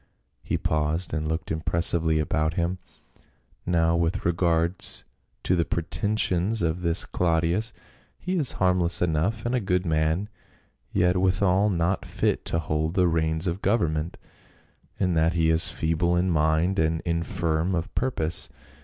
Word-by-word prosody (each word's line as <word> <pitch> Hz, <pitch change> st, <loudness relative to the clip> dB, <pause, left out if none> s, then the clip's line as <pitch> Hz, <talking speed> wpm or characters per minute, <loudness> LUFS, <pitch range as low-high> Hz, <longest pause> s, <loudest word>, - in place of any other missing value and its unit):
He -, -, -2 dB
paused 80 Hz, +3 st, -1 dB
and 75 Hz, +1 st, -2 dB
looked 80 Hz, +2 st, -3 dB
impressively 80 Hz, 0 st, +2 dB
about 75 Hz, +1 st, -1 dB
him. 90 Hz, +2 st, -1 dB, 0.4 s
" -, -, -38 dB
Now 85 Hz, -1 st, +2 dB
with 85 Hz, +5 st, -1 dB
regard 85 Hz, 0 st, 0 dB, 0.6 s
to 90 Hz, -, +1 dB
the 85 Hz, -, +2 dB
pretensions 100 Hz, +3 st, 0 dB
of 85 Hz, +2 st, -1 dB
this 85 Hz, -1 st, +1 dB
Claudius; 85 Hz, +6 st, 0 dB, 0.5 s
he 185 Hz, +1 st, -3 dB
is 150 Hz, -8 st, +4 dB
harmless 90 Hz, -2 st, +3 dB
enough, 90 Hz, +7 st, -1 dB
and 120 Hz, -, -1 dB
a 125 Hz, -, +2 dB
good 90 Hz, -3 st, -1 dB
man, 80 Hz, +4 st, 0 dB, 0.6 s
yet 90 Hz, +1 st, +2 dB
withal 95 Hz, +2 st, +2 dB
not 90 Hz, 0 st, 0 dB
fit -, -, -2 dB
to -, -, 0 dB
hold 80 Hz, +1 st, -2 dB
the 90 Hz, -2 st, +3 dB
reins 80 Hz, 0 st, +1 dB
of 90 Hz, +2 st, -2 dB
government, 85 Hz, -6 st, 0 dB, 0.8 s
in 90 Hz, -2 st, +1 dB
that 80 Hz, +1 st, +2 dB
he 80 Hz, -1 st, +2 dB
is 80 Hz, +1 st, +2 dB
feeble 85 Hz, +2 st, 0 dB
in 90 Hz, +1 st, +1 dB
mind 80 Hz, +4 st, +1 dB
and 80 Hz, 0 st, 0 dB
infirm 85 Hz, +1 st, -1 dB
of 80 Hz, 0 st, -4 dB
purpose. 85 Hz, -11 st, +1 dB
85 Hz, 145 wpm, -25 LUFS, 80-90 Hz, 0.8 s, is